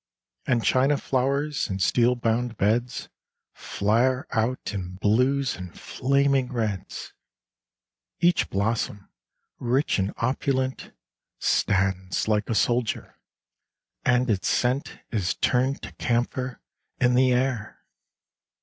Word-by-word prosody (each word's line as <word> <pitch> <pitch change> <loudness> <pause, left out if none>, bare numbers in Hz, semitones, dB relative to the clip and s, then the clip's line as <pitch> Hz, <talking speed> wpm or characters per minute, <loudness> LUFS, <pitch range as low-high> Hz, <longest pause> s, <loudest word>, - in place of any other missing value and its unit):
And 120 -3 +2
china 135 +3 +3
flowers, 140 +3 0
in 95 - -2
steel 120 +6 +3
bound 120 0 -1
beds. 115 +5 0 0.5
Flare 125 +6 +1
out 115 +1 -1
in 90 -2 -5
blues 125 +7 +2
and 90 -1 -9
flaming 135 0 +1
reds; 110 -6 -3 1.1
Each 175 -1 +3
blossom, 100 0 -1 0.5
rich 125 -1 +1
and 95 +1 0
opulent, 130 +1 -1 0.5
Stands 95 -1 +1
like 105 -1 +1
a 115 - 0
soldier; 120 +4 0 0.8
and 125 +1 +3
its 100 -5 0
scent 125 +3 0
Is 95 -5 0
turned 130 +2 +1
to - - -7
camphor 125 +1 -1 0.4
in 125 0 +3
the 130 +1 +4
air. 125 -3 -1
125 Hz, 105 wpm, -25 LUFS, 105-130 Hz, 1.1 s, the